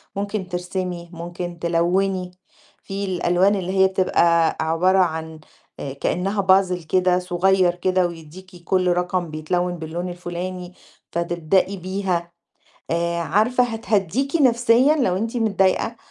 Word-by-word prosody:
ممكن 200 -1 -3
ترسمي، 180 -1 -4
ممكن 175 +1 -6
تلوِّني. 180 +2 0 0.5
في 195 +1 -4
الألوان 185 +1 +2
اللي 185 -2 -3
هي 190 - +6
بتبقى 170 -3 +2
عبارة 170 +4 +2
عن 160 -2 -1 0.4
آآ 135 - -5
كإنّها 190 +8 -1
Puzzle 185 -3 +2
كده 180 0 +2
صغير 180 0 +2
كده 185 0 +1
ويدّيكِ 175 +2 -12
كل 185 +1 +1
رقم 180 -1 0
بيتلوِّن 175 +3 -1
باللون 165 +3 -5
الفُلاني، 180 +1 -6 0.4
فتبدئي 170 +3 0
بيها. 185 -2 -2 0.6
آآ 170 +1 0
عارفة 220 +9 +2
هتهدّيكِ 225 - -1
نَفْسيًا 250 +1 +4
لو 220 -11 +1
أنتِ 225 +5 -3
متضايقة، 215 0 +1
180 Hz, 120 wpm, -22 LUFS, 170-195 Hz, 0.6 s, هي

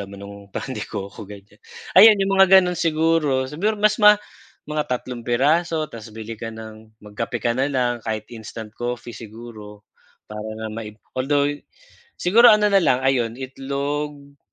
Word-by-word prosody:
laman 100 0 -9
nung 100 0 -10
pan 130 - -5
de - - -5
coco, 100 +2 -7
ganiyan. 105 +1 -14 0.4
Ayan 215 +1 +9
yung 195 0 0
mga 190 - +7
ganon 180 -2 0
siguro, 160 -5 +1
siguro 185 +11 -1
mas 215 +2 +2
ma 210 0 +8 0.5
mga 150 0 -3
3 125 -1 -5
piraso 155 +5 +1
ta's 115 -2 -10
bili 110 0 -8
ka 115 - -5
ng 110 0 -12
magkape 115 +3 -5
ka 120 - +1
na 130 +3 0
lang 125 -3 0
kahit 110 -1 -3
instant 110 -1 -9
coffee 120 0 -5
siguro, 110 -2 -11 0.5
para 105 0 -6 0.2
nga 110 - -5
maib 110 -1 -7 0.2
althou 140 +2 +1
gh 145 - -9 0.5
siguro 225 +7 +5
ano 210 -2 +6
na 200 - +5
lang 130 -8 +2
ayun 125 -4 +1
itlog 140 +2 -5
130 Hz, 165 wpm, -22 LUFS, 110-155 Hz, 0.5 s, Ayan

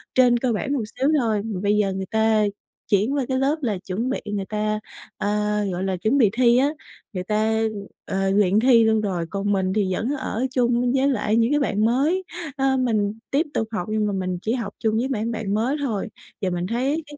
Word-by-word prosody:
trên 250 -2 +5
cơ 245 -1 0
bản 275 +6 -2
một 265 -5 0 0.2
xíu 270 +2 +3
thôi, 220 -4 +1
mà 210 -5 -3
bây 205 +1 +2
giờ 200 -2 +1
người 190 0 -3
ta 220 -1 +3 0.5
chuyển 210 +6 +3
qua 275 -3 0
cái 260 - 0
lớp 275 +3 +2
là 220 -7 -1
chuẩn 215 +7 -2
bị 265 - -1
người 205 -2 -3
ta, 215 +1 -1 0.4
ờ, - - -2 0.4
gọi 180 +1 -3
là, 190 -1 -1
chuẩn 220 +9 +1
bị 230 -7 +5
thi 240 0 +4
á, 275 +3 +3 0.4
người 185 - -3
ta, 215 +2 +1 0.5
ờ, 195 0 -1
luyện 200 0 +3
thi 235 -1 +5
luôn 220 -1 +3
rồi. 185 -5 -2
Còn 200 +2 -2
mình 190 -1 0
thì 195 -3 +1
vẫn 225 +6 -2
ở 260 -2 -2
chung 245 -1 +2
với 270 +1 +3
lại 215 -4 0
những 230 +2 +3
cái 295 - +3
bạn 215 -6 +1
mới, 290 +11 +2 0.3
ờ, 270 -1 +2
mình 215 -5 +1 0.2
tiếp 290 +5 +2
tục 225 - -1
học 195 -6 -3
nhưng 215 -1 +1
mà 205 - -1
mình 185 -1 -2
chỉ 220 - -1
học 230 -5 -3
chung 220 -1 +1
với 245 +3 0
mảng 230 -3 -1
bạn 220 -3 -3
mới 235 +7 +1
thôi. 220 -7 -2 0.3
Và 190 - 0
mình 175 0 -2
thấy 270 +9 -1
cái 295 0 -11
220 Hz, 230 wpm, -23 LUFS, 205-255 Hz, 0.5 s, trên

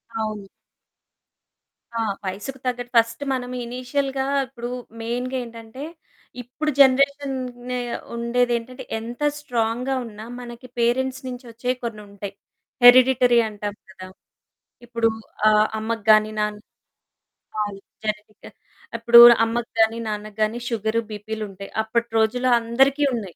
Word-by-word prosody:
అవును. 215 -2 -3 1.5
ఆ! - - -1 0.3
వయసుకు 210 +8 -5
తగ్గట్టు 245 -1 -3
ఫర్స్ట్ 230 +1 +2
మనము 250 -1 -4
ఇనీషియల్‌గా 265 +2 -2 0.2
ఇప్పుడు 240 -1 -7 0.3
మెయిన్‌గా 245 +3 -2
ఏంటంటే, 230 +2 -10 0.6
ఇప్పుడు 270 +6 -3
జనరేషన్ 275 +1 +4 0.3
నె 250 - -1 0.4
ఉండేదేంటంటే, 240 +1 -1 0.2
ఎంత 235 +4 -8 0.2
స్ట్రాంగ్‌గా 245 -1 -1
ఉన్నా 215 -1 -9
మనకి 240 +1 -10
పేరెంట్స్ 260 +3 +1
నుంచొచ్చేవి 245 0 -4
కొన్నుంటాయి. 205 -3 -7 0.5
హెరిడిటరీ 250 -1 +7
అంటాం 205 -1 -5 0.2
కదా! 185 -2 -10 0.8
ఇప్పుడు 230 -1 +1 0.4
ఆహ్, 215 0 +4
అమ్మకి 220 -1 -3
గాని, 215 0 +5
నాన్న 210 0 -1 1.0
అవును 205 -2 -4 0.3
జెనెటిక్. 210 0 -5 0.5
అప్పుడు 235 +1 +7 0.3
అమ్మకి 230 +1 -3
గాని, 225 +1 +2
నాన్నకు 210 0 -5
గాని 215 +2 +1
సుగరు, 225 0 0
బీపీలుంటాయి. 210 -2 -6
అప్పటి 235 +2 -1
రోజుల్లో 245 +3 +1
అందరికి 265 +5 +2
ఉన్నాయి. 205 -7 -5
235 Hz, 110 wpm, -23 LUFS, 215-250 Hz, 1.5 s, హెరిడిటరీ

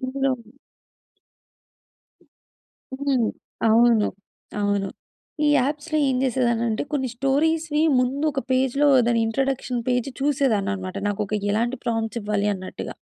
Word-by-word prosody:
ఇందులో 270 +1 0 2.7
హ్మ్. 270 -4 +1 0.4
అవును. 230 -1 +5 0.5
అవును. 205 -1 0 0.6
ఈ - - +4
యాప్స్‌లో 295 +4 -1
ఏం 260 - +1
చేసేదాన్ని 240 -2 +1
అంటే, 220 - -1
కొన్ని 265 -3 0
స్టోరీస్‌‌వి 300 +4 +1 0.2
ముందు 265 +4 0
ఒక 270 - -2
పేజ్‌లో 265 +3 +2 0.2
దాని 235 -1 +2
ఇంట్రడక్షన్ 255 0 -1
పేజ్ 250 +1 0
చూసేదాన్ని 265 -9 +1
అన్నమాట. 185 0 -6
నాకు 205 +1 -2
ఒక 215 - -2 0.2
ఎలాంటి 235 +4 -1
ప్రాంప్ట్స్ 225 -1 -1
ఇవ్వాలి 210 0 0
అన్నట్టుగా. 185 0 -7
250 Hz, 115 wpm, -23 LUFS, 220-275 Hz, 2.7 s, అవును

